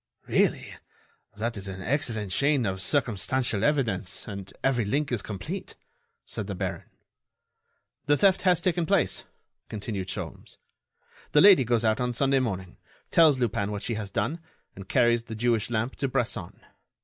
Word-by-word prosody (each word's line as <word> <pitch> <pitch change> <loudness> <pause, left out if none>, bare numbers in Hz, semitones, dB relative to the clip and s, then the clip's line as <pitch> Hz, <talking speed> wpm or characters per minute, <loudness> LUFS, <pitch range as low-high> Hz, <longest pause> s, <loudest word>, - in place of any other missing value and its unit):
"Really, - - +1 0.6
that 115 +2 -2
is 100 0 -5
an 95 -1 -6
excellent 115 -7 -1
chain 140 +3 +2
of 95 -1 -2
circumstantial 120 -3 0
evidence 110 -10 0
and 100 -2 -7
every 130 -3 +2
link 140 +7 -1
is 120 -5 0
complete," 150 - -6 0.5
said - - -5
the - - -4
baron. - - -4 1.2
"The 145 0 +4
theft 195 +1 +4
has 180 -2 +3
taken 175 -3 0
place," - - +1 0.4
continued 100 -3 -4
Sholmes. - - -6 0.8
"The 150 - +6
lady 190 -8 +8
goes 120 -1 +1
out 110 +1 +2
on 125 0 0
Sunday 135 +2 +2
morning, 95 -7 -4 0.3
tells 155 -5 +6
Lupin 110 -5 -1
what 105 -1 -4
she 115 - -1
has 105 -2 -4
done, 130 - -2 0.4
and 95 -1 -11
carries 120 -3 +3
the 110 - -7
Jewish 115 -1 +1
lamp 120 +2 -2
to 140 - 0
Bresson. 110 -8 -2
120 Hz, 155 wpm, -27 LUFS, 100-140 Hz, 1.2 s, lady